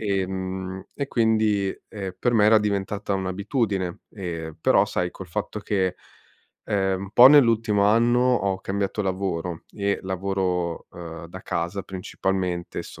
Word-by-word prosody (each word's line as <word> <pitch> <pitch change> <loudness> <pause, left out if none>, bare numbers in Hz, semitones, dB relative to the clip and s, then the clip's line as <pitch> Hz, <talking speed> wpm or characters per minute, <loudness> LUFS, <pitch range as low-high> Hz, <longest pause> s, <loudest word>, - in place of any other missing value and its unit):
Ehm, 95 -1 -3
e 140 -1 -3
quindi, 110 -5 +2
ehm, 95 -3 -6
per 120 - +2
me 110 -3 +4
era 110 +1 +7
diventata 100 -1 -1
un'abitudine, 95 0 -1
ehm, 85 -5 -6
però - - +4
sai 90 -1 -2
col 95 - -10
fatto 85 +5 -4
che, 95 -3 -1 0.7
ehm, 95 -2 0
un 100 - -7
po' 125 +1 +9
nell'ultimo 115 -7 +5
anno 120 +3 +4
ho 100 -7 +2
cambiato 100 +2 -2
lavoro, 95 -3 -3
e 100 -1 -1
lavoro, 95 -2 -2
uhm, 85 -1 -8
da 95 +2 -10
casa 85 +4 -2
principalmente, 95 -2 -3
sto - - -12
95 Hz, 140 wpm, -24 LUFS, 95-105 Hz, 0.7 s, po